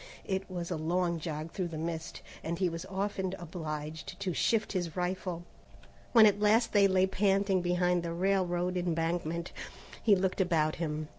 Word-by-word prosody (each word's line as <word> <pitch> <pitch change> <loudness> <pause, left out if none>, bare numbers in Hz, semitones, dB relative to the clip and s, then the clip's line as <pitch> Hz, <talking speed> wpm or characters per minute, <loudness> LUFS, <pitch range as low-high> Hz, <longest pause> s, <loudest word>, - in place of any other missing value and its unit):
It 190 0 -2
was 175 -2 -4
a - - -1
long 170 +2 0
jog 155 0 -5
through 185 -1 -2
the 165 -2 -6
mist, 165 +1 -4 0.2
and 170 +1 -2
he 185 -1 +1
was 165 +2 -6
often 190 -1 -2
obliged 155 -2 -6
to 185 -3 -1
shift 220 +5 +1
his 175 -4 -3
rifle. 180 -1 -2 0.7
When 225 -3 +8
at 205 -1 +4
last 220 +3 +3
they 200 -2 +6
lay 190 -1 +4
panting 195 0 +2
behind 180 0 +2
the 170 0 -4
railroad 180 0 +1
embankment, 170 -1 -1 0.5
he 210 -3 +5
looked 190 +1 0
about 160 -4 +1
him. 155 -2 -3
180 Hz, 165 wpm, -31 LUFS, 165-190 Hz, 0.7 s, When